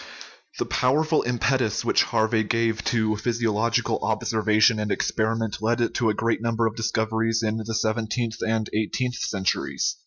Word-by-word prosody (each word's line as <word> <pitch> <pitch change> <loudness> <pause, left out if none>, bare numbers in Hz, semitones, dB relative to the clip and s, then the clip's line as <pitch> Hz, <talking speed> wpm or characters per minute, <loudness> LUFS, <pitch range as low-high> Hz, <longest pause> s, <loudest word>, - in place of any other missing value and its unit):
The - - -1
powerful 155 +5 +2
impetus 125 -2 0
which - - +4
Harvey 110 0 +1
gave 115 0 0
to 110 -2 +1
physio 115 0 -1
logical 110 +2 0
observation 110 0 +2
and 105 -1 -2
experiment 110 -1 -1
led 115 +1 0
to 115 - +1
a 105 - 0
great 115 +1 0
num 115 0 -1
ber 115 +1 +1
of 110 -1 -1
discoveries 115 0 0
in 110 0 0
the 110 - -5
sixteenth 110 +1 -1
and 110 -1 0
seventeenth 125 +4 -2
centuries. 95 -2 -1
115 Hz, 155 wpm, -24 LUFS, 110-115 Hz, -, which